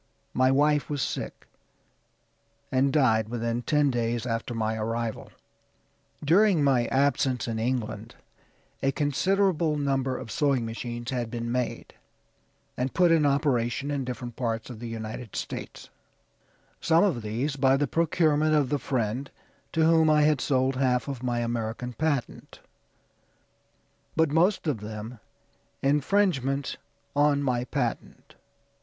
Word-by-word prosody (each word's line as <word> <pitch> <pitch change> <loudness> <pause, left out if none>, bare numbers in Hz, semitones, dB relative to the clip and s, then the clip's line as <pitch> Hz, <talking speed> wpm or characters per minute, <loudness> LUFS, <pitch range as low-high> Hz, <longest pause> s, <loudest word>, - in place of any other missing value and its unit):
My 130 0 +3
wife 145 +2 +2
was 145 -1 -2
sick, - - -5 1.2
and 135 +1 +2
died 110 -7 +3
within 115 0 -2
ten 145 +3 +2
days 120 -1 -1
after 115 0 -3
my 110 0 -1
arrival. 115 +1 -3 1.0
During 180 0 +4
my 130 -4 +3
absence 135 -3 +1
in 115 -1 -2
England 115 -2 -3 0.7
a 135 - +2
considerable 165 +2 +1
number 135 -2 0
of 115 -4 -8
sewing 135 -1 +1
machines 120 +1 -5
had 120 -3 -2
been 115 0 -4
made, 125 -1 -3 0.8
and 125 +1 -3
put 175 -2 +4
in 155 -3 +4
operation 140 -1 0
in 140 -2 -1
different 120 -1 -6
parts 115 -1 -3
of 115 - -9
the 120 - -6
United 110 0 -6
States; - - -6 0.9
some 165 +2 +4
of 175 - +1
these 120 +7 -2
by 135 -1 +3
the 145 - +1
procurement 155 -1 +2
of 145 -4 +2
the 145 - 0
friend 125 +1 -2 0.4
to 160 -1 +2
whom 160 -1 +5
I 150 -1 +4
had 150 -3 +3
sold 130 -1 +1
half 130 -1 +1
of 135 -4 -5
my 120 -1 -1
American 120 +1 -3
patent 145 0 -3 1.6
but 160 -2 +2
most 180 +6 +2
of 145 -8 -1
them 110 +2 -7 0.6
infringements 140 -2 +1 0.4
on 145 0 +3
my 125 -2 0
patent." - - -4
130 Hz, 135 wpm, -27 LUFS, 120-150 Hz, 1.6 s, whom